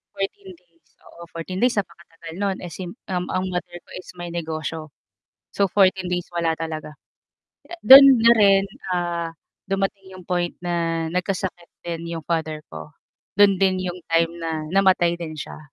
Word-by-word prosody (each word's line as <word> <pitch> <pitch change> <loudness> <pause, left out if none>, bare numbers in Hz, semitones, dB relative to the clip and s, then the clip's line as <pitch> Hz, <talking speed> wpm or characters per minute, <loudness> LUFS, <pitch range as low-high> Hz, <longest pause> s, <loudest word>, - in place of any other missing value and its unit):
14 195 -1 -5
days, 165 -3 -35 0.2
oo, 170 - -15
14 185 +3 -5
days 245 -1 +3
napakatagal 165 -3 -6
no'n. 195 -2 0
Eh 170 - -8
sim 180 0 -6 0.2
um, 180 -1 -1
ang 185 0 -1
mother 180 -1 -5
ko - - -27
is - - -14
may 175 0 -6
negosyo. 160 -1 -5 0.7
So, 200 - +3
14 190 -1 +3
days 180 -1 -2
wala 165 -1 0
talaga. 155 -1 -6 0.9
Do'n 275 +1 +11 0.2
na 230 +1 +7
rin, 195 -1 +5 0.3
ah, 170 -1 -2 0.4
dumating 195 -1 -2
'yong 185 - -13
point 175 -1 -1
na 165 -2 -1
nagkasakit 180 -1 -3 0.2
din 170 0 -5
'yong 160 - -7
father 160 -2 -2
ko, 80 -1 -9 0.5
do'n 200 -2 +6
din 185 -1 +2
'yong 180 0 -5
time 165 0 +2
na 160 -1 -3
namatay 185 -3 +3
din 160 -2 -6
siya. 150 - -8
175 Hz, 160 wpm, -22 LUFS, 165-190 Hz, 0.9 s, Do'n